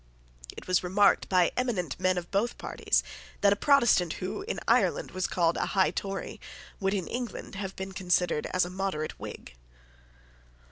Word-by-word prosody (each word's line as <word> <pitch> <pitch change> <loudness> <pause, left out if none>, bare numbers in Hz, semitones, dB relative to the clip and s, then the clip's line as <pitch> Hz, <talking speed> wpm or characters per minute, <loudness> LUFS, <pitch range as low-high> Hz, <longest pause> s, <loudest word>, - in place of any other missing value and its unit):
It - - -8
was 185 0 +2
remarked 195 +3 +3
by 180 -2 +4
eminent 210 - -1
men 185 0 +2
of 175 -1 -5
both 210 +5 0
parties - - 0 0.4
that 200 0 +5
a - - -2
Protestant 235 - +4
who, 185 - -4
in 415 - -4
Ireland, - - +2
was 185 0 -1
called 170 -2 +1
a - - 0
high 190 - +4
Tory 195 -1 -5 0.4
would 195 0 0
in 185 -3 -2
England 245 -2 -5
have 195 -1 -5
been 190 0 -5
considered 180 -4 0
as 185 -1 +1
a 175 - -7
moderate 185 -5 -3
Whig. 65 - -8
190 Hz, 170 wpm, -28 LUFS, 180-205 Hz, 0.4 s, that